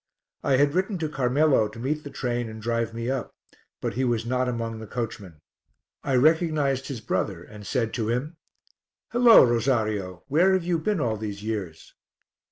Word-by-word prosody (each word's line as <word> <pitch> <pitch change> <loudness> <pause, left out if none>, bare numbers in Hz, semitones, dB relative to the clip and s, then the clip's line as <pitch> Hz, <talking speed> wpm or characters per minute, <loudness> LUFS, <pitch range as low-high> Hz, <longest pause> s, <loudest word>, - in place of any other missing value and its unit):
I 135 - +3
had 145 +1 +3
written 190 +2 0
to 160 -2 -2
Carmelo 135 -3 +2
to 105 - -12
meet 150 +6 -2
the 145 - -7
train 120 -3 -2
and 110 0 -8
drive 115 +1 -1
me 115 +1 -5
up, 130 -1 -3 0.4
but - - -3
he 130 - -1
was 120 -2 0
not 125 +1 0
among 115 -2 -3
the 110 - -8
coachmen. 100 -8 -6 0.6
I 135 - 0
recognized 150 -2 +2
his 130 -6 -5
brother, 95 -4 -2
and 105 +1 -11
said 115 -4 -1
to 110 -3 -2
him 140 +8 -2 0.7
"Hullo! 240 -1 +8
Rosario, 110 -7 0
where 180 +7 +4
have 190 -2 +1
you 170 -1 0
been 205 +3 0
all 115 -6 0
these 105 -1 -6
years?" 100 -8 -5
120 Hz, 175 wpm, -25 LUFS, 110-145 Hz, 0.7 s, Hullo